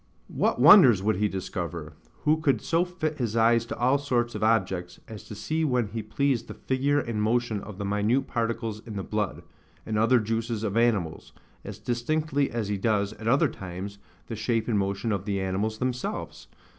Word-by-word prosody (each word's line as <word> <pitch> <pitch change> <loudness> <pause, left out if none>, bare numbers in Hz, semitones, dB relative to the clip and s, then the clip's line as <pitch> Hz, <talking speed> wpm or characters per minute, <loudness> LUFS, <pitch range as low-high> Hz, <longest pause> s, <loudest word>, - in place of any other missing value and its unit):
What - - +1
wonders 130 - +8
would 105 -2 +1
he 105 +2 +2
discover, 85 -5 -5 0.3
who 155 +1 +3
could 140 -4 +2
so 165 +1 +1
fit 160 -4 -4
his 115 -2 -1
eyes 115 +1 +3
to - - -5
all 130 +4 +3
sorts 120 -4 0
of 105 - -4
objects, 95 -6 0
as 110 -2 -9
to 105 - -9
see 155 +10 -2
when 125 -7 +1
he 110 +2 -4
pleased 120 +3 -1
the - - -8
figure 140 +2 0
and 115 -6 -2
motion 110 -1 0
of 105 -2 -9
the 100 - -4
minute 105 +7 +1
particles 115 -3 -2
in 110 - -7
the 95 - -3
blood, 105 -1 -3 0.4
and 110 -1 -1
other 120 +3 +4
juices 115 0 -2
of 105 -2 -2
animals, 105 -9 0 0.3
as 105 0 -7
distinctly 140 +6 -1
as 115 -3 -3
he 100 0 -1
does, 105 -1 +1
at 110 0 -8
other 140 +6 +4
times, 95 -2 -7 0.3
the 115 - -6
shape 110 +1 -1
and 110 -4 +1
motion 100 +3 -1
of 100 -2 -2
the 100 -2 -1
animals 95 +4 -1
themselves? 125 0 -4
115 Hz, 195 wpm, -27 LUFS, 100-125 Hz, 0.4 s, wonders